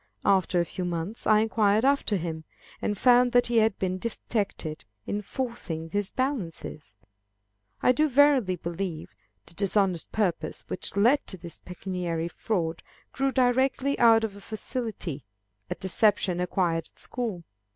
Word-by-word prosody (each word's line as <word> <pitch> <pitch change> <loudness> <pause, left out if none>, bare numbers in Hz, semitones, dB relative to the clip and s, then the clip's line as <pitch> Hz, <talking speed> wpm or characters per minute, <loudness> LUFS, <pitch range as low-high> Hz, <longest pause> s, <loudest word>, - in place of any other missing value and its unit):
After 190 -2 +3
a 170 - +2
few 185 - -5
months, 175 +5 -3
I 215 0 +6
inquired 220 0 +2
after 280 -6 +2
him, 160 -3 -3 0.4
and 205 - -1
found 245 +2 +5
that 245 0 +5
he 240 -1 +1
had 220 -2 +2
been 185 0 -2
detected 200 -7 -3 0.2
in 205 - -2
forcing 195 -9 -4
his 205 0 0
balances! 175 - -4 0.9
I - - +6
do 305 +5 +2
verily 270 -8 +4
believe, 170 -1 -5 0.3
the - - 0
dishonest 195 -2 +1
purpose, 170 -7 -1
which - - -4
led 245 +8 +4
to 190 - -3
this 170 -1 -7
pecuniary 180 -2 -4
fraud, 170 -4 -2 0.3
grew 270 0 +1
directly 260 +2 +2
out 225 -1 +6
of 215 -3 -3
a 200 - -11
facility 215 - -4 0.5
at - - -4
deception 190 -1 +2
acquired 175 -2 0
at - - -38
school. 220 -9 -3
200 Hz, 145 wpm, -27 LUFS, 175-235 Hz, 0.9 s, I